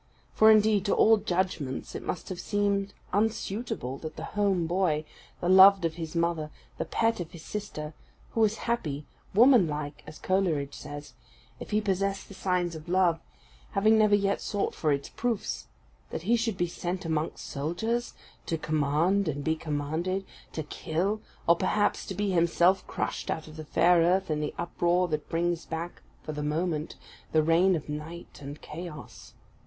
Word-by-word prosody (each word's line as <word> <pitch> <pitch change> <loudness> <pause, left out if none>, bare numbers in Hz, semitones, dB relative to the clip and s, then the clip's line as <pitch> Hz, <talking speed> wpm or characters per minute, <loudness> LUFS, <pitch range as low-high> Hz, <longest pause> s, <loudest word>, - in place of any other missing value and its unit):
For, 220 - +6
indeed, 215 -2 +5
to 200 - +2
all 225 0 +6
judgments 180 -9 -2
it - - -5
must 175 - -4
have 185 -2 -5
seemed 200 -1 0 0.2
unsuitable 205 - -1
that 155 - -7
the - - -7
home 195 -4 +2
boy, 165 -3 +1 0.4
the 175 - -1
loved 190 0 +8
of 165 - 0
his 165 0 -6
mother, 170 -2 0 0.3
the - - -1
pet 230 -2 +1
of 170 -2 -4
his 165 -2 -10
sisters, 155 -7 -5 0.4
who 225 - 0
was 220 0 +3
happy 150 -11 -2 0.3
womanlike 165 - +4
(as 155 0 -9
Coleridge 165 -7 0
says), 145 0 -8 0.5
if - - -8
he 210 0 +2
possessed 195 -1 -1
the - - -11
signs 180 -2 0
of 160 +1 -9
love, 175 -2 +3 0.5
having 215 +2 +4
never 210 -1 +5
yet 200 -1 +1
sought 205 -1 -1
for 155 - 0
its 140 -1 -1
proofs 235 -3 -2 0.4
that - - -5
he 230 +6 +3
should 225 -4 -1
be 175 - +2
sent 175 +1 -4
amongst 160 -1 -2
soldiers, 220 +12 -2 0.3
to 165 - 0
command 155 +6 +1
and 145 -1 -2
be 160 +2 +1
commanded; 160 +5 -2 0.3
to 155 - -3
kill, 175 +8 -2 0.2
or 170 - +6
perhaps 205 +4 0
to 190 - -4
be 205 +1 0
himself 175 +2 +3
crushed - - -3
out 160 - -2
of 155 - -11
the 155 -1 -7
fair 175 +3 +4
earth 180 +1 +2
in 150 - 0
the 150 -1 -3
uproar 175 +1 +1
that 155 -2 -3
brings 170 0 0
back 165 +2 -5 0.2
for - - -5
the 150 -1 -4
moment 155 +1 -1 0.4
the 155 -1 +4
reign 175 +4 +4
of 155 - -5
Night 155 +3 -7
and 145 +1 -8
Chaos. 160 -2 -9
175 Hz, 170 wpm, -28 LUFS, 155-200 Hz, 0.5 s, loved